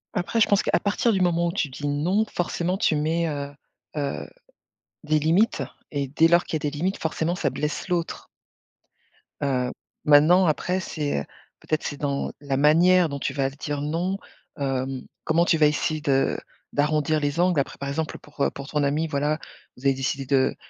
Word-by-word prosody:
Après 180 +6 0
je 220 - +5
pense 200 - +4
qu'à - - +1
partir 210 +3 +1
du 195 -3 +1
moment 170 -1 +2
où - - 0
tu 170 -5 -1
dis 145 +2 -5
non, 175 +9 +1
forcément 175 +1 -1
tu 195 - +2
mets, 160 +3 0
heu, 145 -2 -4 0.5
heu, 140 -1 -3 0.7
des 155 0 +2
limites 175 +9 +2 0.3
et 140 -2 -1
dès 155 +5 +4
lors 170 +1 +4
qu'il - - -4
y 150 - -1
a - - +1
des 145 - -9
limites, 185 +6 -1
forcément, 160 +1 -1
ça - - 0
blesse 150 +5 -3
l'autre. 175 -2 -2 1.1
Heu, 125 -3 0 0.3
maintenant, 155 +6 +6
après 180 +4 0
c'est, 150 - -2
heu, - - -4 0.4
peut-être, 155 0 -2
c'est 145 - -4
dans 140 -1 -2
la 140 -2 -2
manière 170 +4 +5
dont 140 -1 -4
tu - - -2
vas 135 -2 0
le 135 - -15
dire, 145 -1 -4
non, 170 +6 -1 0.4
heu, 135 -2 0 0.4
comment 165 +2 +3
tu 170 - +3
vas 155 -1 +6
essayer 155 +1 -1
de 135 -3 +2 0.4
d'arrondir 150 +1 +2
les 145 +2 -1
angles 175 -3 +3
après, 135 - -2
par 140 - -5
exemple, 155 +2 -3
pour, 150 -1 -11
heu, - - +3
pour 140 0 -9
ton 150 -1 -1
ami 145 +3 +1
voilà, 150 +1 0 0.4
vous 125 - -13
avez 135 - +5
décidé 135 +1 -2
de 130 0 +2
150 Hz, 195 wpm, -25 LUFS, 140-170 Hz, 1.1 s, maintenant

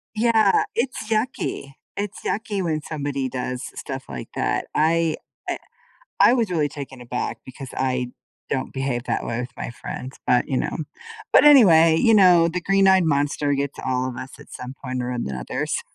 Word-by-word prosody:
Yeah, 220 -2 +4
it's 235 -2 -2
yucky. 215 - -2 0.2
It's 205 -1 -4
yucky 210 -3 -2
when 155 -3 -1
somebody 145 -3 -3
does 125 0 -4
stuff 135 -1 -6
like 65 -3 -7
that. - - -1
I 165 +1 +2 0.3
I - - -1 0.6
I - - +7
was 230 -6 0
really 155 -4 +1
taken 135 -3 -8
aback, 125 0 -4
because 130 0 -9
I 125 -1 0 0.4
don't 130 -2 -2
behave 135 -3 -2
that - - -2
way 115 +1 -2
with 125 +1 -5
my - - -5
friends, 130 +2 -8
but, 125 -1 +3
you 135 - 0
know. - - -2 0.6
But, - - +7
anyway, 165 - +7
you 225 +7 +4
know, 180 -4 +6
the 180 +2 -3
green-eyed 190 0 +4
monster 145 -1 +1
gets 140 0 -3
all 130 0 -1
of 125 - -6
us 130 +2 -7
at 145 - -15
some 125 +1 -8
point 130 -1 -3
or 125 - -3
another, 70 - -3
so. - - -1
145 Hz, 175 wpm, -23 LUFS, 130-185 Hz, 0.6 s, I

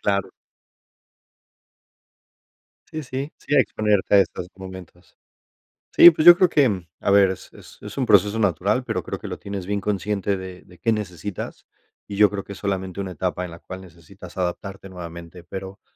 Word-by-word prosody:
Claro. 100 -1 0 2.6
Sí, 155 - -5
sí, 135 +2 -5
sí, - - -3
a 140 - +7
exponerte 105 -4 +1
a - - +8
estos 90 -2 -2
momentos. 95 -2 -12 0.8
Sí, 175 - +10
pues 160 0 -1
yo 175 0 +11
creo 185 -1 +4
que, 110 - +2 0.2
a - - 0
ver, 100 -1 +6
es 95 - -7 0.3
es - - -9
un - - 0
proceso 105 +2 +4
natural, 100 +4 +1
pero - - -2
creo - - -5
que - - -8
lo - - -6
tienes 100 -2 -6
bien 100 +1 -1
consciente 100 0 -1
de 95 -1 -9
de 90 -1 -19
qué 115 - +1
necesitas, 100 -2 -5 0.4
y 100 - -7
yo 105 0 +6
creo 100 -1 -5
que - - -9
es - - -9
solamente 95 -1 -3
una 95 -2 -4
etapa 90 +2 -2
en 90 - -7
la 85 - -10
cual 95 +2 -9
necesitas 90 +1 -14
adaptarte 95 +2 -4
nuevamente, 85 -1 -9
pero, 95 +2 -8
95 Hz, 175 wpm, -23 LUFS, 90-105 Hz, 2.6 s, yo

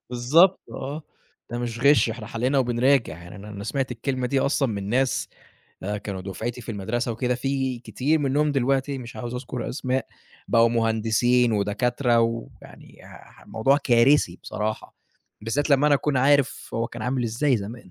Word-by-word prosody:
بالضبط، 150 +10 +4
آه. 145 +4 -6 0.5
ده 120 - -3
مش 120 -1 -4
غِش، 140 -3 +5
إحنا 110 -1 -7
حلّينا 125 +5 0
وبنراجع، 125 - +2
يعني 85 +3 -11
أنا 105 +1 -10
أنا 100 -1 -7
سمعت 130 +2 -2
الكلمة 125 +2 -2
دي 135 +2 +1
أصلًا 140 -1 +1
من 100 -3 -4
ناس 130 +3 0 0.5
آآ 105 +2 -3
كانوا 100 -2 -6
دُفعتي 110 +6 -5
في 115 0 -6
المدرسة 115 +4 -2
وكده، 125 +2 -1
في 130 -1 -2
كتير 140 +6 0
منهم 145 +1 +1
دلوقتي، 135 +1 0
مش 120 -2 -9
عاوز 120 +2 -5
أذكُر 125 -1 -5
أسماء، 130 -1 -2 0.4
بقوا 115 0 +5
مهندسين 115 +1 +2
ودكاترة، 120 +4 +1
ويعني 115 0 -5
آآ - - -16
الموضوع 135 +6 +2
كارثي 120 -7 +3
بصراحة، 110 +2 -4 0.5
بالذات 140 +7 -1
لمّا 140 +1 +4
أنا 150 - +5
أكون 140 0 0
عارف 140 +1 +2
هو 115 +1 0
كان 115 -1 -8
عامل 125 +1 -1
إزاي 120 +4 +1
زمان. 105 -1 -8
120 Hz, 165 wpm, -24 LUFS, 115-135 Hz, 0.5 s, غِش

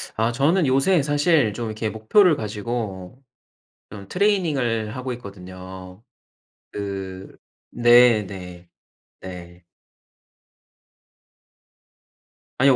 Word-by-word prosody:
아. 115 +2 +1
저는 150 +7 +2
요새 140 +6 +3
사실 145 - +2
좀 120 +1 -4
이렇게 110 0 -3
목표를 155 - +3
가지고 105 -1 -5 0.7
좀 100 -1 -10
트레이닝을 145 - 0
하고 130 0 -4
있거든요. 95 -2 -11 0.7
그 95 -2 -6 0.4
네네. 105 -7 +3 0.5
네. 90 -1 -10 2.9
아니요. 135 0 +5
110 Hz, 170 characters per minute, -22 LUFS, 95-135 Hz, 2.9 s, 아니요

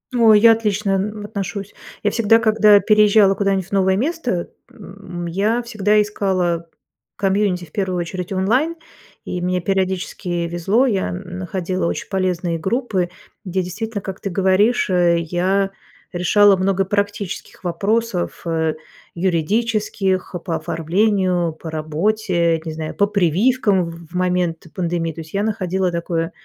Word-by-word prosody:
Ой, 225 -3 +6
я 230 +2 +7
отлично 210 -2 0
н 205 +2 -2
отношусь. 200 -1 -5 0.3
Я - - +2
всегда, 225 -1 +4
когда 215 -2 +5
переезжала 210 -1 +5
куда-нибудь 195 -2 0
в - - -34
новое 190 -1 +2
место, 245 - -2 0.2
м, 195 -3 -9
я 205 +8 0
всегда 215 -3 +1
искала 185 -5 -1 0.5
комьюнити, 195 -2 0
в 155 - -22
первую 190 -3 -2
очередь 180 +2 -5
онлайн, 240 - +1 0.5
и 180 - -4
мне 180 +1 0
периодически 185 -2 -2
везло. 195 +9 +1
Я 200 -7 0
находила 185 -1 -3
очень - - -4
полезные 180 -3 -1
группы, 195 -2 -1 0.4
где 185 0 -1
действительно, 210 +4 -5
как 195 -1 -6
ты 195 - -4
говоришь, 195 +5 +2
э, 175 -2 +3
я 185 +4 0 0.4
решала 195 +3 +4
много 195 +1 +1
практических 205 -1 -3
вопросов, 195 +2 -1
э, 160 -2 0 0.4
юридических, 190 +2 0
по 170 -3 -1
оформлению, 180 +1 0
по 160 0 -9
работе, 170 +1 0
не 160 - -3
знаю, 155 0 -5
по 200 - +2
прививкам 200 - +2
в 165 0 -12
момент 180 -3 0
пандемии. 170 -2 -1
То 165 - -7
есть 155 - -13
я 200 - 0
находила 190 -4 -1
такое 170 -1 -2
190 Hz, 135 wpm, -20 LUFS, 175-210 Hz, 0.5 s, я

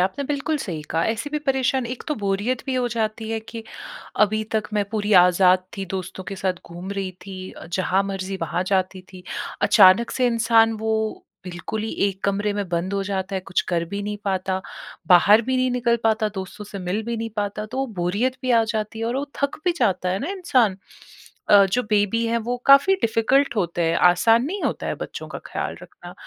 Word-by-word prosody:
आपने 190 +10 0
बिल्कुल 290 +2 -1
सही 170 - -5
कहा। 165 +1 +1
ऐसी 230 +6 -2
भी 300 - -1
परेशान 265 -3 0
एक 250 +1 -6
तो 300 - 0
बोरियत 205 +4 -1
भी 265 - -1
हो 250 -1 +1
जाती 220 -1 -2
है 225 - -2
कि 225 +1 -9 0.6
अभी 215 +1 +3
तक 215 - 0
मैं 205 -1 +2
पूरी 210 -1 -1
आज़ाद 180 0 +4
थी, 195 - -3
दोस्तों 190 +1 -6
के 195 - -6
साथ 190 -1 0
घूम 175 +3 -8
रही 195 -2 -3 0.2
थी, 185 -1 -7
अ, - - -11
जहाँ 185 +1 +1
मर्ज़ी 195 -1 -4
वहाँ 180 - -1
जाती 190 -1 0
थी। 180 -1 -11 0.4
अचानक 190 +6 +6
से 255 - +1
इंसान 230 -1 +4
वो 220 - +1 0.5
बिल्कुल 180 +4 -5
ही 220 - -3 0.2
एक 195 -1 -8
कमरे 205 +1 0
में 205 -2 -3
बंद 175 +3 -2
हो 200 - 0
जाता 195 0 -3
है, 190 - -1
कुछ 185 0 -1
कर 170 -2 0
भी 200 - -2
नहीं 210 0 -3
पाता, 190 -1 -1 0.5
बाहर 200 +6 +6
भी 260 +2 -1
नहीं 255 0 +1
निकल 240 -1 +1
पाता, 220 -1 +2
दोस्तों 190 +2 -6
से 205 -1 -8
मिल 185 +4 -2
भी 235 +1 -3
नहीं 225 0 -4
पाता, 205 +1 -2
तो 260 - -6
वो 270 - 0
बोरियत 210 +9 0
भी 255 - -1
आ 230 -2 +5
जाती 215 0 -3
है 225 - -2
और 245 +3 -1
वो 280 - -2 0.2
थक 280 - 0
भी 355 - +3
जाता 185 -6 +1
है 185 +2 0
ना 285 - -4
इंसान। 255 - +1 0.7
अ, 200 -1 +8
जो 250 - +2
बेबी 210 +2 +2
है 230 +1 +1
वो 245 +1 -1
काफ़ी 275 +8 +7
डिफ़िकल्ट 235 +4 +2
होते 175 -3 0
हैं, 165 0 +1
आसान 225 +8 +4
नहीं 375 +7 -4
होता - - -2
है - - -1
बच्चों - - -7
का - - -6
ख़्याल - - -4
रखना। - - -12
210 Hz, 215 wpm, -23 LUFS, 190-235 Hz, 0.7 s, अ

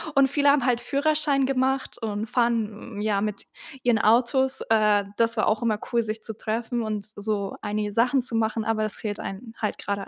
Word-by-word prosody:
Und 275 -1 +5
viele 285 0 +3
haben 280 -3 +3
halt 245 -2 +1
Führerschein 285 0 +1
gemacht 265 0 0
und 215 0 -3
fahren, 225 -3 -1
ja, 205 -2 +1
mit 210 -1 -2 0.4
ihren 235 -3 +3
Autos. 255 +4 +3
Äh, 210 -2 +3
das 230 0 +2
war - - +2
auch 215 0 +1
immer 220 -3 0
cool, 235 -1 +3
sich 220 0 -4
zu 220 - -5
treffen 235 +2 -2
und 210 -2 -3
so 205 -2 -3
einige 210 0 -2
Sachen 245 +5 +2
zu 235 -1 -2
machen, 220 0 0
aber 220 -1 0
es 215 - +1
fehlt 210 -1 -4
einem 225 +4 -7
halt 210 - -1
grade 200 -1 -4
225 Hz, 195 wpm, -25 LUFS, 210-245 Hz, 0.4 s, Und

